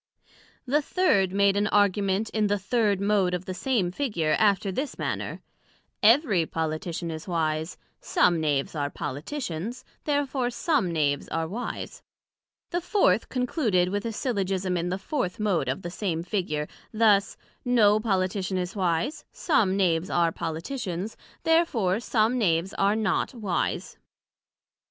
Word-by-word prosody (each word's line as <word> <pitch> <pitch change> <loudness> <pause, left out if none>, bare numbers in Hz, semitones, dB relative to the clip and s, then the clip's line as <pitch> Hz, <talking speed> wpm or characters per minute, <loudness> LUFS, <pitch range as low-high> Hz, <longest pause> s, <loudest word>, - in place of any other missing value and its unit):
The 285 +4 +2
third 230 - +2
made 200 0 +3
an 205 +1 +2
Argument 205 0 +2
in 215 -1 +1
the 205 0 +1
third 205 0 +1
Mode 200 -3 +2
of 180 +1 -5
the 185 - -4
same 195 -2 0
Figure, 180 - 0
after 200 -2 +3
this 270 +9 -3
manner: - - -3 0.6
Every 215 - +4
Politician 165 +1 -3
is 160 +2 -7
wise: 160 -1 -1 0.2
some 170 -2 +2
Knaves 145 -3 0
are 145 -3 -1
Politicians, 185 - -5 0.2
Therefore 280 -4 0
some 250 - 0
Knaves 145 -3 0
are 165 0 -2
wise. 230 +8 -5 0.7
The 350 - 0
Fourth 390 +4 +2
concluded 240 - +1
with 205 +2 -2
a 230 - -1
Syllogism 195 -6 -1
in 175 0 -1
the 185 - -1
fourth 195 -1 -3
Mode 180 -11 +1
of 135 - -3
the 175 - -5
same 170 -4 -2
Figure, 170 -5 -2 0.2
thus; 215 -3 +3 0.3
No 215 -4 +4
Politician 190 -2 0
is 180 +2 -3
wise: 180 - -1
some 200 - +1
Knaves 175 -2 +1
are 170 -1 +2
Politicians, 180 - -4 0.3
Therefore 245 - +2
some 235 +1 +1
Knaves 175 -3 +1
are 200 +2 +2
not 220 +3 0
wise. 205 -7 -2
195 Hz, 140 wpm, -26 LUFS, 175-225 Hz, 0.7 s, Every